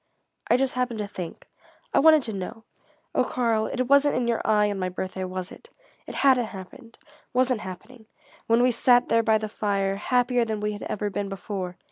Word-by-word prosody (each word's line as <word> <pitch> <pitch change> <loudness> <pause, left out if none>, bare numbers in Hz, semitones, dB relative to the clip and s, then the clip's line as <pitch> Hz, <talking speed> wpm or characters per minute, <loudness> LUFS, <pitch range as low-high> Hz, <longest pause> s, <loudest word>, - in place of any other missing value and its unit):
"I 240 - +5
just 265 0 0
happened 250 -2 -1
to 210 - -2
think 180 -4 -8 0.5
I - - +4
wanted 310 -1 +6
to 225 - -4
know 200 +4 -6 0.5
oh - - +3
Karl, 230 -3 0
it 255 - -1
wasn't 280 +3 +4
in 250 -1 0
your 235 -1 0
eye 210 -1 +3
on 200 - -4
my 185 -1 -1
birthday, 185 +1 -5
was 185 0 -5
it? 465 - -14 0.4
It - - -7
hadn't 260 -3 +4
happened 220 +4 -11 0.4
wasn't 250 -2 +2
happening 215 +5 -10 0.4
when 230 +1 +4
we 250 - +4
sat 245 +1 +4
there 230 - +4
by 220 -1 +3
the 215 0 -4
fire, 200 -2 -1
happier 245 +2 +1
than 220 -2 -3
we 210 0 -1
had 205 - -7
ever 205 0 -3
been 200 0 -3
before?" 190 -2 -5
220 Hz, 200 wpm, -25 LUFS, 200-250 Hz, 0.5 s, wanted